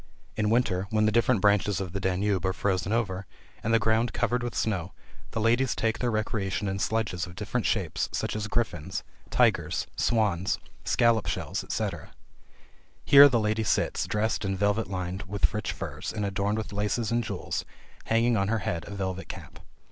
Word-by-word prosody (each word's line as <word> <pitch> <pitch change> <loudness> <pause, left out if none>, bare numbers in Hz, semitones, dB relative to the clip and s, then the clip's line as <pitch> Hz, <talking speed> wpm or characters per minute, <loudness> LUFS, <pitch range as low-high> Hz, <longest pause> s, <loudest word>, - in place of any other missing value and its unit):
In 105 -1 +1
winter, 105 -5 +1
when 110 0 +2
the 110 - +3
different 120 -1 +3
branches 105 -1 +3
of 95 -3 -5
the 100 - -2
Danube 95 0 0
are 95 - +1
frozen 95 0 -1
over, 100 -5 -1 0.4
and 115 - 0
the 115 - +6
ground 110 +2 +1
covered 125 0 0
with 120 -1 -4
snow, 95 -5 -1 0.4
the - - -4
ladies 120 +3 +2
take 110 -1 0
their 125 - +1
recreation 105 -2 -1
in 95 0 -2
sledges 100 -5 -1
of 90 - -11
different 105 +4 -2
shapes, 95 -8 -1
such - - -2
as 105 0 -2
griffins, 100 -7 -2 0.3
tigers, - - +2
swans, 100 -5 +1 0.3
scallop 115 -2 +3
shells, - - -2
etc. - - -3 1.0
Here 140 0 +9
the 120 -3 +2
lady 110 +1 0
sits, 105 - 0
dressed 105 +1 0
in 95 -1 -1
velvet 105 +3 +1
lined 90 0 -3
with 100 +1 0
rich 105 - -2
furs, - - -5
and 105 -2 -2
adorned 100 +2 -1
with 110 -2 -4
laces 105 +2 -1
and 120 0 +1
jewels, - - -3 0.4
having 115 +1 +3
on 100 -2 +1
her 115 +2 +1
head 85 -2 -2
a 100 - -7
velvet 95 -1 -3
cap. - - -9
105 Hz, 180 wpm, -27 LUFS, 95-115 Hz, 1.0 s, Here